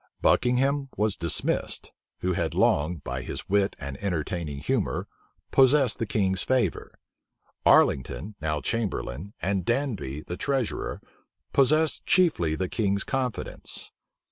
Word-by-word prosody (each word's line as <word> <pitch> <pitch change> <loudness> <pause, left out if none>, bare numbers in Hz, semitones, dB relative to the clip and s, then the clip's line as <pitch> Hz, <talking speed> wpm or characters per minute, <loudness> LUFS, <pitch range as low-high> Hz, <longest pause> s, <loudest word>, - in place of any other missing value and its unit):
Buckingham 135 +3 +2
was 105 -1 +1
dismissed, 85 -2 -1 0.3
who 90 0 +1
had - - -1
long, 75 +5 +3
by 65 -4 -5
his - - -6
wit 100 0 +2
and 70 -2 -7
entertaining 85 -4 -2
humor, 70 - -1 0.4
possessed 135 -2 +4
the 115 - -1
king's 95 -3 +1
favor. 130 -2 0 0.8
Arlington, 70 - +3
now 75 -1 -1
chamberlain, 100 - -3
and 95 -1 0
Danby, 115 - -1
the 90 +3 -6
treasurer, 135 -5 -2 0.5
possessed 155 +3 +3
chiefly 155 - +3
the 95 +3 -1
king's 100 -1 0
confidence. 130 -4 -3
100 Hz, 115 wpm, -27 LUFS, 80-130 Hz, 0.8 s, possessed